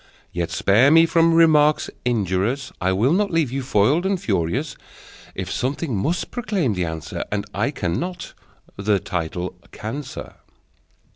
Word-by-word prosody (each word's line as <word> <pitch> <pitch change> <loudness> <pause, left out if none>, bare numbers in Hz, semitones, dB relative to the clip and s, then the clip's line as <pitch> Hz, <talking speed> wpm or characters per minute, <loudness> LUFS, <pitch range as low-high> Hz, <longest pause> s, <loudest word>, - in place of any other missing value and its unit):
Yet 85 -1 -2
spare 110 +8 +4
me 165 +2 +7
from 165 0 +3
remarks 155 -2 +5 0.2
injurious: 115 +3 0
I 95 0 +2
will 110 - +2
not 200 +2 +2
leave 165 -7 +1
you 135 +1 -2
foiled 130 - +2
and 190 -1 0
furious. 110 - -1 0.6
If - - -4
something 135 0 -2
must 155 - -1
proclaim 200 - -1
the 90 -2 -1
answer, 80 -1 -5
And 105 -1 -1
I 105 +7 0
cannot, 165 - -3 0.4
the 100 +1 +2
title 90 +1 -3 0.2
can, 115 +7 -5
sir! 135 - -9
130 Hz, 145 wpm, -22 LUFS, 100-165 Hz, 0.6 s, me